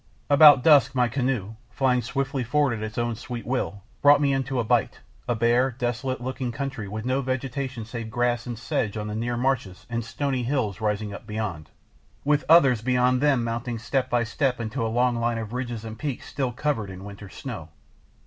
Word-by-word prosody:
About 145 -3 +8
dusk 145 -4 +6
my 125 -1 +3
canoe, 125 -4 -1 0.2
flying 125 -2 +1
swiftly 135 +2 -2
forward 140 +1 +2
at 110 - -5
its 110 0 -6
own 120 0 0
sweet 120 +1 -7
will, 115 -6 -2 0.2
brought 145 0 +7
me 140 -1 +2
into 135 -1 -1
a - - +1
bight, 120 +1 +1 0.3
a 120 - +1
bare, 120 +3 +3
desolate 125 +1 -2
looking 130 0 -3
country 135 -3 -4
with 110 +3 -5
no 130 +2 +1
vegetation 130 -2 -3
save 115 0 -6
grass 120 +1 0
and 120 -2 -4
sedge 115 -4 -2
on 105 - -3
the 105 - -4
near 120 +2 -2
marshes 120 -7 -1
and 115 0 -1
stony 130 +3 -2
hills 115 -5 -1
rising 105 -1 -1
up 110 - -10
beyond, 105 -8 -4 0.6
with 150 +1 +3
others 135 -9 +6
beyond 125 +1 +2
them 140 -5 +3
mounting 115 +1 -3
step 125 +4 -1
by 120 -1 +2
step 125 +2 0
to 125 -1 -2
a - - +1
long 120 +2 +1
line 115 0 0
of 115 0 -5
ridges 120 -3 -4
and 110 0 -7
peaks 140 -5 -4
still 135 -3 -2
covered 120 -5 -2
in 95 0 -9
winter 100 0 -9
snow. 100 - -7
120 Hz, 195 wpm, -25 LUFS, 115-135 Hz, 0.6 s, About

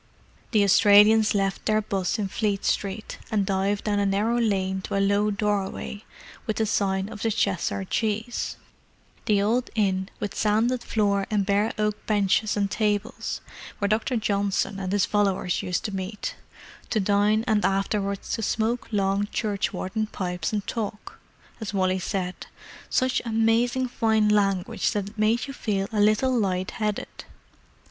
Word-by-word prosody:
The 215 -4 +3
Australians 210 +2 +6
left 195 -1 -1
their 215 0 +3
'bus 195 -3 -1
in 205 -2 -1
Fleet 200 0 -1
Street, 200 +2 -2
and 205 -3 +1
dived 195 +1 0
down 205 -1 0
a 200 - +2
narrow 215 +5 +1
lane 190 -4 0
to 195 - -4
a - - +2
low 200 +1 +2
doorway 205 0 -2 0.4
with 220 - 0
the 220 - +1
sign 195 -2 0
of 210 -2 -9
the 225 - +1
Cheshire 195 -2 0
Cheese—the 220 0 -3
old 235 +4 +1
inn 190 -3 +1
with 205 - -3
sanded 225 +4 +1
floor 200 -2 +1
and 205 -2 +1
bare 205 +2 +2
oak 210 0 -1
benches 210 0 +2
and 200 -1 0
tables, 210 0 -1 0.4
where 200 - 0
Dr. 220 +4 0
Johnson 200 -2 0
and 185 -1 -3
his 205 -1 +2
followers 195 -4 0
used 180 -1 -2
to 205 - -3
meet, 190 +2 -4 0.5
to 220 - +1
dine 205 +2 +2
and 215 -3 +2
afterwards 195 0 -1
to - - -1
smoke 225 +3 -1
long 200 0 +1
churchwarden 210 0 -2
pipes 180 -4 -3
and 210 -2 -2
talk, 210 -2 -5 0.4
as 215 -2 -5
Wally 185 -1 +1
said, 185 -1 -4 0.4
"such 255 -1 +1
amazing 230 +3 +2
fine 220 -3 +2
language 195 -3 +1
that 205 -1 -2
it 210 - -19
made 220 +3 +2
you 275 - -7
feel 200 -6 -1
a 210 - 0
little 215 +5 +3
light 190 -4 0
headed." 210 -2 -4
205 Hz, 155 wpm, -25 LUFS, 195-220 Hz, 0.5 s, Australians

